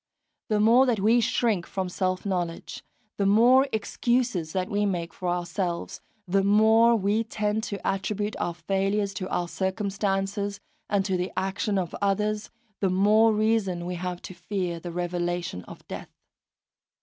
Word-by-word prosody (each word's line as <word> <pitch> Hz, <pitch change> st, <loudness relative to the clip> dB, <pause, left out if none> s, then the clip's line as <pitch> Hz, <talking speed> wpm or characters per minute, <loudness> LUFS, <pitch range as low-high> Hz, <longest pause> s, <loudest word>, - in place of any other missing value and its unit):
The 215 Hz, -1 st, +2 dB
more 235 Hz, +5 st, +5 dB
that 235 Hz, -4 st, +1 dB
we 225 Hz, +4 st, +4 dB
shrink 220 Hz, -6 st, +1 dB
from 190 Hz, -1 st, -3 dB
self 185 Hz, +1 st, -2 dB
knowledge, 175 Hz, -4 st, -3 dB, 0.3 s
the 200 Hz, -, +1 dB
more 245 Hz, +6 st, +5 dB
excuses 225 Hz, -5 st, 0 dB
that 185 Hz, +1 st, -1 dB
we 205 Hz, +1 st, 0 dB
make 175 Hz, -4 st, -2 dB
for 180 Hz, -2 st, -3 dB
ourselves, 175 Hz, 0 st, -3 dB, 0.3 s
the 195 Hz, +2 st, +2 dB
more 220 Hz, +3 st, +5 dB
that 200 Hz, -, -5 dB
we 210 Hz, +3 st, +2 dB
tend 215 Hz, -1 st, -1 dB
to 200 Hz, -, -5 dB
attribute 205 Hz, +2 st, -1 dB
our 170 Hz, -, -2 dB
failures 195 Hz, +3 st, -1 dB
to 185 Hz, 0 st, -5 dB
our 175 Hz, -, -1 dB
circumstances 200 Hz, +1 st, -2 dB, 0.3 s
and 200 Hz, -2 st, +1 dB
to 190 Hz, -2 st, 0 dB
the 180 Hz, +1 st, -2 dB
action 195 Hz, +2 st, -1 dB
of 180 Hz, -3 st, -2 dB
others, 210 Hz, +1 st, 0 dB, 0.3 s
the 195 Hz, -, +1 dB
more 210 Hz, +4 st, +4 dB
reason 210 Hz, -5 st, +1 dB
we 180 Hz, -, -3 dB
have 180 Hz, 0 st, -5 dB
to -, -, -8 dB
fear 175 Hz, -1 st, -3 dB
the 175 Hz, +1 st, -7 dB
revelation 175 Hz, -, -3 dB
of -, -, -13 dB
death. -, -, -7 dB
195 Hz, 160 wpm, -26 LUFS, 180-210 Hz, 0.3 s, more